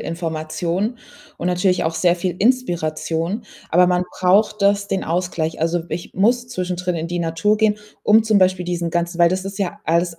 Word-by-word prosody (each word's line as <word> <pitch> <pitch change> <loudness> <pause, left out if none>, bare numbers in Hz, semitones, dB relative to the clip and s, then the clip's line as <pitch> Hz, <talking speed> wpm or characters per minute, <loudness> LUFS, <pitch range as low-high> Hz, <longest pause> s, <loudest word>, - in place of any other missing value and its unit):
Information 170 +6 -3 0.4
und 175 - -3
natürlich 180 +1 +1
auch 160 0 -1
sehr 175 +1 +3
viel 175 0 -3
Inspiration, 175 -4 0 0.3
aber 180 +2 +5
man 180 0 +1 0.2
braucht 205 +4 +3
das 200 0 +2
den 190 - -1
Ausgleich. 165 -1 -2
Also, 165 +2 0
ich 170 - -5
muss 240 +5 +1
zwischendrin 180 -5 -3
in 165 +1 -4
die 175 0 -3
Natur 170 +6 +1
gehen, 210 -1 +2 0.2
um 220 +1 +5
zum 220 -1 +2
Beispiel 185 -1 +2
diesen 175 -1 -2
ganzen 175 0 -2
weil 170 0 +5
das 190 +1 -2
ist 195 +1 -6
ja 200 +1 -3
alles 170 0 0
180 Hz, 185 wpm, -20 LUFS, 170-200 Hz, 0.4 s, aber